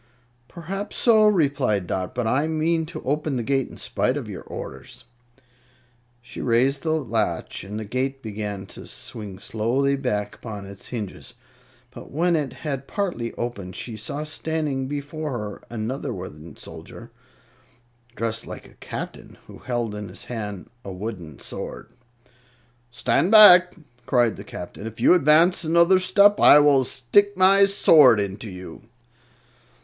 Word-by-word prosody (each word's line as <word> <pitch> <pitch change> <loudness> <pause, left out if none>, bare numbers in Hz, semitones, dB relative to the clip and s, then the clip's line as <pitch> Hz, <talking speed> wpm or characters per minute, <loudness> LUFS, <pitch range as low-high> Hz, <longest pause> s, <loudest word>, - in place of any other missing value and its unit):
"Perhaps 195 +4 -6
so," 220 -3 +5
replied 140 - +1
Dot; 90 +1 -4
"but 125 -1 -1
I 135 +7 +1
mean 160 +1 0
to 170 - -8
open 150 +1 -1
the 120 - -2
gate 135 +2 0
in - - -12
spite - - -1
of - - -5
your - - -7
orders." 120 - -9 1.2
She 125 - -8
raised 130 +3 +2
the 160 -1 0
latch 110 - -2
and 105 +2 -7
the 110 - -5
gate 135 +5 -3
began 105 -2 -5
to - - -11
swing 105 -4 -8
slowly 120 +7 0
back 105 -7 -2
upon 105 -4 -8
its 100 0 -10
hinges; 110 -2 -7 0.6
but - - -11
when 170 +4 +1
it 145 -4 -1
had 140 -3 -5
partly 175 - -3
opened, 100 -7 -5
she 115 - -6
saw 125 +8 -5
standing 155 -3 -3
before 145 +1 -5
her 105 -2 -6
another 120 +4 -4
wooden 85 -5 -9
soldier, - - -11 1.0
dressed 115 0 -3
like - - -9
a - - -19
Captain, - - -7
who - - -13
held 120 -4 -3
in 105 -1 -6
his 90 - -8
hand 105 -6 -6 0.2
a 100 - -7
wooden 90 -6 -7
sword. - - -7 1.0
"Stand 125 +8 +1
back!" 185 -5 +8 0.3
cried 120 -4 +2
the - - -9
Captain. 95 +4 -8
"If 115 - -9
you - - +6
advance 170 +2 +4
another 170 +3 +4
step 200 +2 +4
I - - +8
will 145 -2 +5
stick 180 +12 +1
my 195 +1 +6
sword 150 - +6
into 100 +2 -4
you." 90 -3 -10
130 Hz, 150 wpm, -23 LUFS, 105-155 Hz, 1.2 s, back